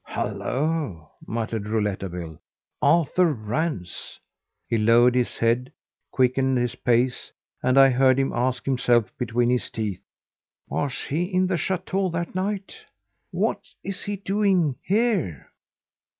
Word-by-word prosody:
"Hullo!" 135 Hz, -, -2 dB, 0.2 s
muttered 110 Hz, -1 st, -3 dB
Rouletabille. 95 Hz, -7 st, -3 dB, 0.4 s
"Arthur 170 Hz, +3 st, +3 dB
Rance!" 110 Hz, -, -4 dB, 0.5 s
He 115 Hz, -, 0 dB
lowered 120 Hz, +3 st, +5 dB
his 125 Hz, -1 st, 0 dB
head, 120 Hz, +3 st, +1 dB, 0.4 s
quickened 130 Hz, 0 st, +2 dB
his 120 Hz, -1 st, 0 dB
pace, 125 Hz, +1 st, 0 dB, 0.3 s
and 130 Hz, +1 st, +2 dB
I 135 Hz, 0 st, +8 dB
heard 130 Hz, +1 st, +4 dB
him 135 Hz, 0 st, 0 dB
ask 125 Hz, +1 st, -1 dB
himself 125 Hz, -4 st, +2 dB
between 120 Hz, 0 st, +1 dB
his 125 Hz, -, 0 dB
teeth: 105 Hz, -5 st, -4 dB, 0.7 s
"Was 140 Hz, -3 st, -2 dB
he 160 Hz, +5 st, -1 dB
in 185 Hz, 0 st, +1 dB
the 185 Hz, 0 st, 0 dB
chateau 190 Hz, +3 st, -1 dB
that 170 Hz, 0 st, -3 dB
night? 200 Hz, -, -3 dB, 0.5 s
What -, -, 0 dB, 0.2 s
is 195 Hz, -1 st, -4 dB
he 205 Hz, -, -2 dB
doing 195 Hz, -7 st, +1 dB
here?" 195 Hz, -, 0 dB
130 Hz, 120 wpm, -24 LUFS, 115-170 Hz, 0.7 s, I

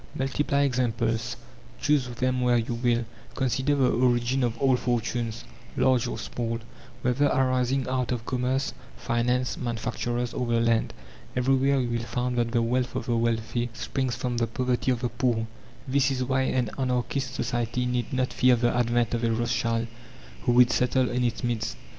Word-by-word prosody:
Multiply 140 Hz, +1 st, 0 dB
examples, 120 Hz, -3 st, 0 dB, 0.4 s
choose 145 Hz, -3 st, +2 dB
them 125 Hz, +1 st, -1 dB
where 125 Hz, -1 st, +3 dB
you 115 Hz, +1 st, -1 dB
will, 120 Hz, 0 st, +1 dB, 0.3 s
consider 135 Hz, +2 st, +1 dB
the 130 Hz, -3 st, +3 dB
origin 125 Hz, +1 st, +2 dB
of 120 Hz, -1 st, 0 dB
all 135 Hz, +1 st, +3 dB
fortunes, 120 Hz, -2 st, -2 dB, 0.3 s
large 130 Hz, -3 st, +3 dB
or -, -, -4 dB
small, 115 Hz, -1 st, -3 dB, 0.5 s
whether 130 Hz, +4 st, +2 dB
arising 130 Hz, 0 st, +1 dB
out 130 Hz, -1 st, -1 dB
of 120 Hz, -2 st, -3 dB
commerce, 130 Hz, +2 st, -1 dB, 0.2 s
finance, 125 Hz, +2 st, 0 dB
manufacturers, 120 Hz, 0 st, -2 dB
or 125 Hz, -, -2 dB
the 115 Hz, 0 st, +2 dB
land. 115 Hz, -1 st, +2 dB, 0.4 s
Everywhere 135 Hz, +2 st, +3 dB
you 125 Hz, -2 st, -1 dB
will 120 Hz, 0 st, 0 dB
find 125 Hz, +1 st, -2 dB
that 120 Hz, -1 st, +1 dB
the 115 Hz, -1 st, +1 dB
wealth 125 Hz, +2 st, 0 dB
of -, -, -2 dB
the 120 Hz, -, 0 dB
wealthy 115 Hz, +1 st, 0 dB
springs 130 Hz, +1 st, -2 dB
from 120 Hz, 0 st, -2 dB
the 115 Hz, 0 st, +1 dB
poverty 125 Hz, +2 st, -1 dB
of 125 Hz, -2 st, +1 dB
the 120 Hz, -, 0 dB
poor. 120 Hz, -1 st, 0 dB, 0.4 s
This 135 Hz, +1 st, +2 dB
is 130 Hz, -1 st, -1 dB
why 130 Hz, +1 st, +1 dB
an 125 Hz, -4 st, 0 dB
anarchist 130 Hz, 0 st, -1 dB
society 120 Hz, 0 st, -1 dB
need 125 Hz, -2 st, -1 dB
not 130 Hz, -1 st, 0 dB
fear 125 Hz, -1 st, +5 dB
the 120 Hz, 0 st, +1 dB
advent 120 Hz, -1 st, +1 dB
of 120 Hz, 0 st, -1 dB
a 115 Hz, -, +2 dB
Rothschild 115 Hz, 0 st, 0 dB, 0.6 s
who 120 Hz, -, +3 dB
would 125 Hz, 0 st, +6 dB
settle 125 Hz, 0 st, +2 dB
in 125 Hz, 0 st, 0 dB
its 120 Hz, +2 st, -1 dB
midst. 120 Hz, -3 st, -2 dB
125 Hz, 170 wpm, -26 LUFS, 120-130 Hz, 0.6 s, would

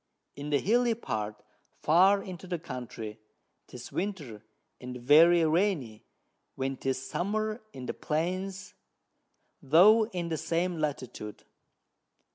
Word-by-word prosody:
In 145 Hz, +1 st, -6 dB
the 145 Hz, -, +3 dB
Hilly 235 Hz, -, +2 dB
part, 105 Hz, -, -4 dB, 0.3 s
far 190 Hz, +5 st, +4 dB
into 185 Hz, 0 st, -8 dB
the 175 Hz, -1 st, -2 dB
Country, 120 Hz, -7 st, -7 dB, 0.5 s
'tis 125 Hz, -1 st, -10 dB
Winter, 160 Hz, -, -4 dB, 0.4 s
and 125 Hz, 0 st, -7 dB
very 160 Hz, +7 st, +6 dB
rainy, 155 Hz, -, 0 dB, 0.5 s
when 135 Hz, 0 st, -2 dB
'tis 130 Hz, 0 st, -3 dB
Summer 215 Hz, +4 st, -2 dB
in 130 Hz, -1 st, -8 dB
the -, -, -3 dB
Plains, 185 Hz, +5 st, -3 dB, 0.9 s
though 205 Hz, +10 st, +6 dB
in 175 Hz, -5 st, -4 dB
the 160 Hz, -, -1 dB
same 170 Hz, +2 st, -1 dB
Latitude. 130 Hz, -8 st, -4 dB
160 Hz, 115 wpm, -29 LUFS, 130-190 Hz, 0.9 s, very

